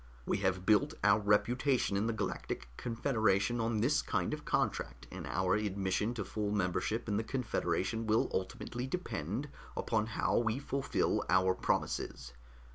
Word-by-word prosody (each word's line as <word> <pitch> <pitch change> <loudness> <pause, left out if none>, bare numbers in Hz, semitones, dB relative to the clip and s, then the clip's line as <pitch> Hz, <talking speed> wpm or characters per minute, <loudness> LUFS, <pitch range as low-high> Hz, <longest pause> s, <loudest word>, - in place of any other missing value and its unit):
"We - - +1
have 95 -1 0
built 105 0 +4
our 100 0 +5
reputation 120 +3 +2
in 100 +3 +1
the - - +1
Galactic 100 - -3
Confederation 115 - +1
on 115 -1 0
this 140 +6 +3
kind - - -1
of - - -6
contract, 60 - -1
and - - -6
our 95 +1 +1
admission 105 +2 0
to 105 -4 -3
full 105 +1 -2
membership 105 +3 0
in 105 -2 +1
the 110 - 0
Confederation 115 -3 -1
will 110 +1 +3
ultimately 120 +6 -3
depend 120 - -3 0.3
upon 110 -1 0
how 110 - +1
we 115 0 0
fulfill 140 0 0
our 95 0 +4
promises. 65 -7 -2
110 Hz, 150 wpm, -33 LUFS, 95-120 Hz, 0.3 s, our